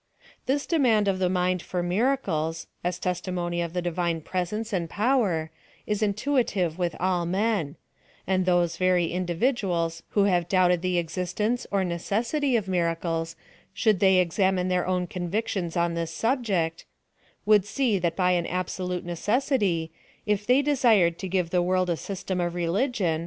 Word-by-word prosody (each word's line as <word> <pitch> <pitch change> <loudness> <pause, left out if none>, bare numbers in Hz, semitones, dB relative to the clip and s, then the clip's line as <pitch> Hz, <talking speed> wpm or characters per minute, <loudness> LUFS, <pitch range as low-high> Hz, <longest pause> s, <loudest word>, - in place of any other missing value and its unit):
This 280 +2 +1
demand 240 -11 +2
of 190 -1 +1
the 185 -1 +2
mind 180 -1 +1
for 180 0 -3
miracles, 175 - 0 0.2
as 180 +1 -2
testi 180 +1 -2
mony 175 -1 -2
of 170 -1 -4
the 180 -1 -2
divine 170 -1 -1
presence 195 +7 -3
and 170 -3 -1
power, 205 -9 +1 0.3
is 210 0 -2
intuitive 205 - 0
with 175 -1 -1
all 180 -1 0
men: 190 -5 0 0.5
and 185 0 0
those 175 -2 +2
very 180 -2 +2
individuals 175 -2 -1 0.2
who 200 - +6
have 175 -3 +1
doubted 180 -2 +3
the 180 -1 0
existence 185 +8 -2
or 200 -1 +1
necessity 230 - -1
of 215 -4 0
miracles, 165 -2 -1 0.4
should 215 -5 +2
they 190 -1 +5
examine 185 +1 +1
their 180 -1 0
own 180 -1 0
convictions 180 0 -3
on 170 0 +1
this 165 -1 -2
subject, 195 -6 -1 0.6
would 210 -2 +5
see 215 0 0
that 170 -2 -1
by 180 -1 +2
an 175 -1 +1
absolute 180 0 -3
necessity, 195 - 0 0.3
il 210 -1 +1
they 255 +3 +4
desired 230 - +3
to 190 - -4
give 180 -2 -1
the 180 - +2
wo 185 +1 +1
'd - - -6
a - - +1
system 185 +1 -4
of 175 0 -2
religion. 180 - 0
180 Hz, 160 wpm, -26 LUFS, 170-210 Hz, 0.6 s, who